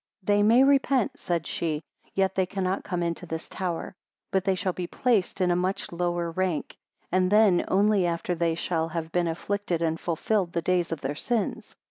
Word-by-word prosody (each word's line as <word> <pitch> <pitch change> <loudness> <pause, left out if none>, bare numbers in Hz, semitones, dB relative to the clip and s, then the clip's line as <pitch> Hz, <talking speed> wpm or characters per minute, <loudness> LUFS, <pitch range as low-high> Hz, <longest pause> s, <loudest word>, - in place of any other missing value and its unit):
79 205 - +3
They 205 - +4
may 260 - +7
repent, 270 -3 +2
said 170 -3 -1
she, 160 -2 -2 0.3
yet 190 -1 +2
they 185 -1 +1
cannot 190 0 -2
come 180 -3 -2
into 170 +1 -3
this 160 0 -5
tower; 180 -3 -4 0.4
but, 190 -1 +1
they 195 -1 +2
shall 185 0 -1
be 180 -1 -4
placed 225 -5 +1
in 180 -1 +3
a - - +3
much 185 +2 -1
lower 175 -1 -1
rank, 180 -2 -2 0.4
and 185 +1 +2
then 210 -4 +5
only 200 -1 +3
after 170 +1 -1
they 165 -1 0
shall 165 -1 -1
have 165 0 -4
been 175 0 +1
afflicted 180 +1 -2
and 165 -1 0
fulfilled 175 +2 -1
the 170 - 0
days 180 -1 +1
of 160 -3 -3
their 135 +1 -2
sins. 225 +8 -2
180 Hz, 195 wpm, -27 LUFS, 170-195 Hz, 0.4 s, may